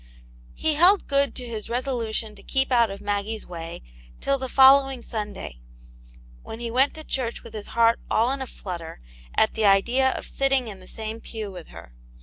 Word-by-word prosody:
He 315 Hz, -, +1 dB
held 355 Hz, +6 st, +5 dB
good 280 Hz, 0 st, +1 dB
to 250 Hz, -, -6 dB
his 225 Hz, -3 st, -6 dB
resolution 235 Hz, -3 st, -2 dB
to -, -, -14 dB
keep 265 Hz, 0 st, 0 dB
out 235 Hz, -3 st, +4 dB
of 195 Hz, 0 st, -7 dB
Maggie's 205 Hz, +2 st, -2 dB
way 165 Hz, -, -7 dB, 0.4 s
till 275 Hz, 0 st, 0 dB
the 260 Hz, 0 st, -4 dB
following 270 Hz, -1 st, +6 dB
Sunday, 210 Hz, -, -6 dB, 0.8 s
when 225 Hz, -, -8 dB
he 235 Hz, -1 st, -4 dB
went 265 Hz, +4 st, +2 dB
to 315 Hz, -, -7 dB
church 250 Hz, -5 st, -3 dB
with 230 Hz, -, -12 dB
his 215 Hz, -2 st, -7 dB
heart 230 Hz, 0 st, +5 dB
all 235 Hz, +3 st, +2 dB
in 270 Hz, 0 st, -2 dB
a 265 Hz, -, -4 dB
flutter 170 Hz, -, -7 dB, 0.4 s
at 220 Hz, -, +4 dB
the 220 Hz, -, 0 dB
idea 235 Hz, +7 st, +4 dB
of -, -, -6 dB
sitting 270 Hz, -2 st, +1 dB
in 200 Hz, -3 st, -7 dB
the 185 Hz, -, -13 dB
same 220 Hz, +1 st, -6 dB
pew 215 Hz, -3 st, -6 dB
with 180 Hz, -3 st, -10 dB
her. 85 Hz, -7 st, -13 dB
230 Hz, 190 wpm, -25 LUFS, 205-265 Hz, 0.8 s, following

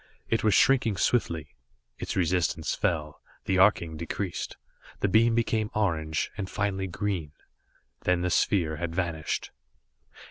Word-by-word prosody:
It 115 Hz, -, +1 dB
was 110 Hz, -2 st, +4 dB
shrinking 120 Hz, -5 st, +4 dB
swiftly. 85 Hz, -, 0 dB, 0.5 s
Its -, -, -4 dB
resistance 85 Hz, -3 st, +1 dB
fell, 80 Hz, -6 st, -1 dB, 0.2 s
the 95 Hz, -1 st, +1 dB
arcing 85 Hz, -5 st, +3 dB
decreased; 85 Hz, +3 st, -4 dB, 0.4 s
the -, -, +2 dB
beam 115 Hz, +4 st, +4 dB
became 110 Hz, -2 st, +1 dB
orange 80 Hz, -6 st, 0 dB
and 95 Hz, -2 st, -3 dB
finally 100 Hz, -2 st, -1 dB
green. 90 Hz, -5 st, -3 dB, 0.7 s
Then 90 Hz, -1 st, +2 dB
the 90 Hz, 0 st, 0 dB
sphere 80 Hz, -6 st, +2 dB
had 85 Hz, 0 st, -4 dB
vanished. 85 Hz, -4 st, -2 dB
90 Hz, 130 wpm, -28 LUFS, 80-105 Hz, 0.7 s, was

